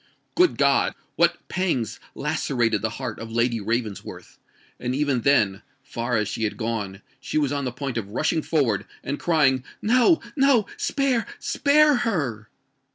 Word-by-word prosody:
Good 360 0 +3
God! - - +3 0.2
what - - +2
pangs 165 - -1 0.2
lacerated 120 -4 0
the 110 - 0
heart 125 -5 -5
of 115 0 -7
Lady 115 0 +1
Ravensworth;—and 115 +3 -5
even 140 -3 +1
then—far 120 +1 0
as 105 -1 0
she 110 - -3
had 105 - -1
gone—she 110 +1 -4
was 145 -3 +1
on 140 -1 -2
the 125 - -2
point 125 -1 -3
of 100 -3 -7
rushing 155 +8 0
forward, 120 - 0 0.2
and 145 - -3
crying, 135 -6 +2 0.2
"No! 250 +9 +4 0.2
no!—spare—spare 275 - +2
her!" 140 - -2
130 Hz, 130 wpm, -24 LUFS, 115-175 Hz, 0.2 s, No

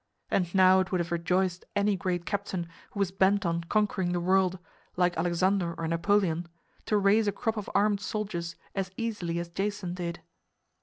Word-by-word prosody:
And 180 -1 0
now 185 0 +7
it 185 -1 -1
would 185 - +2
have 170 -1 -2
rejoiced 180 +1 0
any 205 0 +2
great 180 -2 -2
captain 195 -4 -3 0.2
who 200 - -8
was 195 -2 +1
bent 195 +1 +2
on 170 0 -1
conquering 190 -2 +1
the 175 - 0
world, 185 +1 +2 0.4
like 180 0 +2
Alexander 175 +1 +1
or 165 0 -3
Napoleon, 170 0 +1 0.4
to 210 - +3
raise 205 +2 +4
a - - +3
crop 220 +3 -2
of 210 -2 -5
armed 200 0 +3
soldiers 185 -5 -3 0.2
as 195 -2 -2
easily 210 -8 -2
as 170 0 -3
Jason 195 0 -3
did! 175 -1 -4
185 Hz, 175 wpm, -28 LUFS, 175-200 Hz, 0.4 s, now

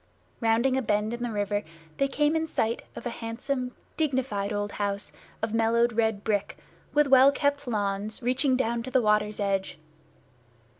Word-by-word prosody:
Rounding 230 +3 +2
a - - +1
bend 210 -1 0
in 240 - -5
the 240 - -1
river, 205 -1 -1 0.4
they 275 - +2
came 295 +2 +1
in 320 0 0
sight 230 -6 -1
of - - -8
a 240 - -2
handsome, 250 +3 -4 0.2
dignified 255 -9 0
old 205 0 -2
house 200 -1 -2 0.3
of 225 -1 -1
mellowed 230 +1 +3
red 220 -2 +1
brick, 205 -2 -1 0.3
with 295 0 +4
well 270 0 +7
kept 285 -1 0
lawns 205 0 -2
reaching 255 +2 +2
down 235 -2 0
to 250 - -6
the 260 - +3
water's 210 -2 +1
edge. 195 -3 -1
230 Hz, 165 wpm, -27 LUFS, 210-260 Hz, 0.4 s, well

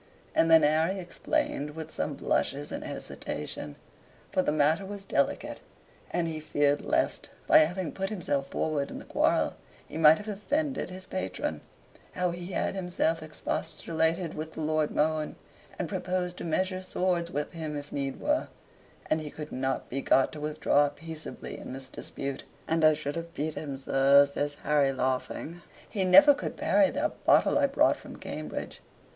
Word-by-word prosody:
And 165 - +3
then 160 -1 +7
Harry 160 +5 +3
explained, 175 - -2
with 160 -1 -6
some 150 - -2
blushes 140 +1 -1
and - - -4
hesitation 75 - -5 0.6
(for - - +2
the 165 - +1
matter 155 +4 +3
was 200 0 -7
delicate, 140 -7 0 0.5
and 175 -1 0
he 160 -1 -3
feared 145 -1 +1
lest, - - 0 0.2
by - - +7
having 165 +1 +1
put 195 +4 -3
himself 165 -9 -1
forward 145 0 -1
in - - -7
the - - -9
quarrel, - - +2 0.3
he 160 - -6
might 155 0 +8
have 210 - -9
offended 270 +6 -1
his 185 0 -9
patron), 90 - -3 0.5
how 180 -1 0
he 175 0 -6
had - - 0
himself 175 -4 0
expostulated 160 +2 -1
with 155 +1 -6
the - - -5
Lord 155 0 +1
Mohun, 155 0 0 0.4
and - - -2
proposed 180 -1 -2
to - - -6
measure 185 +3 0
swords 180 -2 0
with 145 -2 -3
him 155 -3 -4
if 145 0 -7
need 135 -1 -3
were, 300 +1 +1 0.6
and 155 0 +1
he 150 - -5
could 150 +1 -8
not 130 +1 -2
be 135 +2 -3
got 135 - +3
to 155 - -8
withdraw 150 -1 +2
peaceably 160 +2 -6
in - - -7
this 135 0 -6
dispute. 140 -1 -5 0.2
"And 165 0 +1
I 155 0 +7
should 145 -1 -4
have 170 0 -6
beat 155 +2 -2
him, 140 -3 -5
sir," 135 +1 +5
says 145 +1 -3
Harry, 145 -2 +3
laughing. 130 +6 -2 0.3
"He 195 -3 -1
never 290 +11 +9
could - - -5
parry 295 -2 +4
that - - -2
botte - - +6
I 285 -1 +4
brought 285 +3 +3
from - - -11
Cambridge. - - -6
155 Hz, 170 wpm, -29 LUFS, 145-180 Hz, 0.6 s, never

